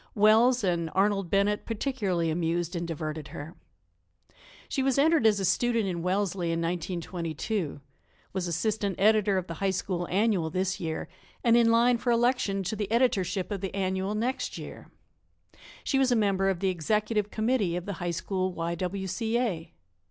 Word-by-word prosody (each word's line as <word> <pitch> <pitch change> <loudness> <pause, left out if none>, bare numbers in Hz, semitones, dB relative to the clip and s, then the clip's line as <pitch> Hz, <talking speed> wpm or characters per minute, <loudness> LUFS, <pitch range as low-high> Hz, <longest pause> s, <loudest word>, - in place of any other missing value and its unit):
Wells 225 +4 +5
and 170 -3 0
Arnold 195 -1 +2
Bennett 200 +2 +2
particularly 205 - -1
amused 170 +1 -1
and 170 0 -3
diverted 155 -2 -4
her. 155 +3 -8 1.1
She 270 - -1
was 265 0 +1
entered 305 -4 +4
as 210 -2 +3
a 195 - 0
student 235 +2 +2
in 175 -3 -2
Wellesley 185 0 0
in 165 0 0
1922; 170 0 -3 0.5
was 185 -2 -2
assistant 200 +3 -1
editor 210 -1 +4
of 185 - -1
the 170 - -6
High 195 - +2
School 180 -2 -2
Annual 195 -4 +1
this 185 +2 -1
year, 160 -2 -3 0.4
and 235 -1 +5
in 235 -1 +5
line 235 +1 +4
for 245 - -2
election 235 -5 +2
to 215 +4 -2
the 210 -1 -4
editorship 195 -6 +1
of 200 -3 -3
the 195 -1 -4
Annual 190 +1 -1
next 245 +5 -2
year. - - -9 0.9
She 270 - +1
was 265 -2 +3
a - - +4
member 195 -3 +2
of 185 -3 -2
the 195 - +2
executive 210 +4 0
committee 215 -6 0
of 175 0 -4
the 200 - -3
High 175 - -1
School 185 +2 -2
Y. 170 0 -2
W. 185 +3 -3
C. 220 +5 -1
A. 195 -10 -2
195 Hz, 175 wpm, -28 LUFS, 175-220 Hz, 1.1 s, Wells